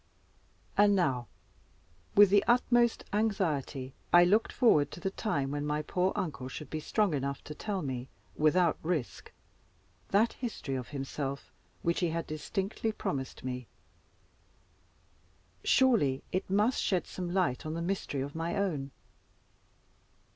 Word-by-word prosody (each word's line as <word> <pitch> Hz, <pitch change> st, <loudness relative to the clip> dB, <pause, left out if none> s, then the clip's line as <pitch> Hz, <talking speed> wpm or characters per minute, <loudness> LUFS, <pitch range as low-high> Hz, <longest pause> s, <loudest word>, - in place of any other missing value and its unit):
And 205 Hz, 0 st, +6 dB
now, 130 Hz, -, +1 dB, 0.9 s
with 205 Hz, -1 st, +8 dB
the 205 Hz, 0 st, +5 dB
utmost 240 Hz, -1 st, +3 dB
anxiety, 160 Hz, -, -1 dB, 0.2 s
I 175 Hz, 0 st, +8 dB
looked 205 Hz, +6 st, +3 dB
forward 155 Hz, -, +4 dB
to -, -, -8 dB
the 190 Hz, +2 st, -2 dB
time 140 Hz, -11 st, -1 dB
when 145 Hz, 0 st, -2 dB
my 150 Hz, +1 st, -1 dB
poor 180 Hz, +4 st, +1 dB
uncle 145 Hz, -7 st, -3 dB
should 135 Hz, +2 st, -8 dB
be 155 Hz, -, -2 dB
strong 205 Hz, +3 st, +1 dB
enough 140 Hz, 0 st, -2 dB
to 150 Hz, -, -7 dB
tell 195 Hz, +3 st, -3 dB
me, 130 Hz, -2 st, -4 dB, 0.3 s
without 160 Hz, +2 st, +3 dB
risk, 160 Hz, -6 st, -3 dB, 0.8 s
that 215 Hz, +4 st, +3 dB
history 225 Hz, -, -5 dB
of 130 Hz, -2 st, -3 dB
himself 140 Hz, 0 st, -5 dB, 0.3 s
which 170 Hz, 0 st, +1 dB
he 175 Hz, -, +1 dB
had 165 Hz, +1 st, -2 dB
distinctly 195 Hz, +8 st, -2 dB
promised 135 Hz, -10 st, -4 dB
me. 125 Hz, -2 st, -4 dB, 2.0 s
Surely 225 Hz, -, +3 dB
it 185 Hz, -, -2 dB
must 210 Hz, +6 st, +2 dB
shed 185 Hz, -3 st, +1 dB
some 180 Hz, -2 st, -5 dB
light 175 Hz, -9 st, +1 dB
on 155 Hz, +1 st, -4 dB
the -, -, -3 dB
mystery 175 Hz, -6 st, -2 dB
of 140 Hz, +1 st, -4 dB
my 165 Hz, +3 st, -2 dB
own. 165 Hz, -9 st, -1 dB
170 Hz, 140 wpm, -31 LUFS, 140-200 Hz, 2.0 s, with